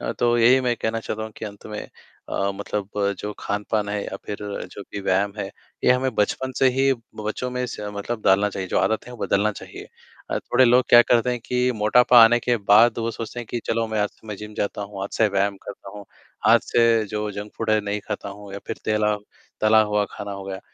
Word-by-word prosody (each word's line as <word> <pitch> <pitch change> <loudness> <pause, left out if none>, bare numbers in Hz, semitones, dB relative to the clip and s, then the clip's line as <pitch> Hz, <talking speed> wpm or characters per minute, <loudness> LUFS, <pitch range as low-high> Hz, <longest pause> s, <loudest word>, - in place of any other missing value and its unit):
अ, - - -3
तो 120 0 +3
यही 125 +3 +6
मैं 125 -2 0
कहना 115 0 -2
चाहता 110 -1 -4
हूँ 110 - -6
कि - - -6
अंत 105 -1 -9
में 105 -1 -7 0.4
अ, 100 0 0
मतलब 100 0 -4 0.3
जो 105 +2 -4
खान-पान 105 0 -2
है, 105 0 -2
या - - -5
फिर 105 - -4 0.4
जो 100 - -8
भी 100 - -4
व्यायाम 100 +1 +1
है, - - -2 0.4
ये - - +5
हमें 130 +1 0
बचपन 130 +5 0
से 135 - +4
ही 135 +2 +2 0.3
बच्चों 110 +4 -3
में 125 0 -2
स - - -6 0.2
मतलब 110 +2 -4
डालना 100 +2 +4
चाहिए, 95 -1 -5
जो - - +1
आदत 110 +2 0
है, 125 - -9
वो - - -9
बदलना 105 +2 +1
चाहिए। - - -10 0.4
अ, - - 0
थोड़े 130 +1 +3
लोग 125 +1 +5
क्या 120 - +9
करते 120 +1 +2
हैं 125 - -1
कि 125 0 +1
मोटापा 120 +3 +6
आने 120 +2 +5
के 120 0 +1
बाद, 110 +3 +5
वो 115 0 -1
सोचते 115 +1 -6
हैं 120 - -8
कि 120 - -2
चलो, 115 0 0
मैं 110 -1 -2
आज 105 - +1
से 110 - -22
मैं 105 - -5
जिम 105 +1 -9
जाता 105 0 -2
हूँ, 100 -1 -7
आज 100 - -4
से 110 - +4
व्यायाम 100 0 0
करता 95 - -9
हूँ, 100 - -9 0.4
आज - - +7
से 115 -1 +3
जो 105 0 -2
जंक 105 +1 -7
फ़ूड 110 -1 -1
है, 110 0 +4
नहीं 105 0 -3
खाता 105 -1 -4
हूँ, 100 0 -10
या 100 - -5
फिर - - -4
तेला 105 -1 +1 0.4
तला 110 0 +5
हुआ 105 0 +2
खाना 100 0 -6
हो 100 0 -7
गया। 95 -1 -6
105 Hz, 240 wpm, -23 LUFS, 100-120 Hz, 0.4 s, क्या